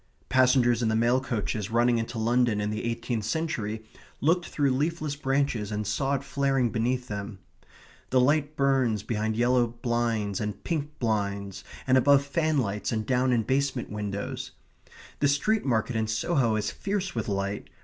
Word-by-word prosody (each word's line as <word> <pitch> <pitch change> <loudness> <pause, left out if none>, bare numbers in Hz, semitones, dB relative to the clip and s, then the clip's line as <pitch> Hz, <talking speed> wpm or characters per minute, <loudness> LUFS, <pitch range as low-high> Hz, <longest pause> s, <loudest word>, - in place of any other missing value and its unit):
Passengers 125 -2 +4
in 115 - +2
the 110 - +1
mail 120 +3 +3
coaches 110 -4 -2
running 120 +1 +3
into 115 +1 -4
London 115 -1 +2
in 105 0 -1
the 105 +2 -3
eighteenth 115 -1 -2
century 110 -5 -2 0.3
looked 175 +5 +2
through 140 -2 +1
leafless 150 +2 -1
branches 135 -6 0
and 105 0 -2
saw 135 +7 0
it 135 - -3
flaring 135 -4 +1
beneath 125 +3 -1
them. 100 -1 -5 0.7
The 130 - +3
light 145 +3 +2
burns 130 -6 +2
behind 110 0 -1
yellow 120 0 +3
blinds 115 -3 -1
and 105 -1 -4
pink 150 -3 -3
blinds, 100 -4 -2 0.2
and 130 0 +5
above 140 +2 +4
fanlights, 140 -9 0
and 110 -2 -1
down 130 +1 +2
in 120 -2 +2
basement 135 +1 -1
windows. 105 -1 -4 0.7
The 145 - +3
street 205 +10 +1
market 120 -1 0
in 110 -1 0
Soho 115 +1 +1
is 105 -1 -1
fierce 195 -1 -3
with 115 -3 -3
light. 100 0 -2
120 Hz, 160 wpm, -27 LUFS, 110-135 Hz, 0.7 s, and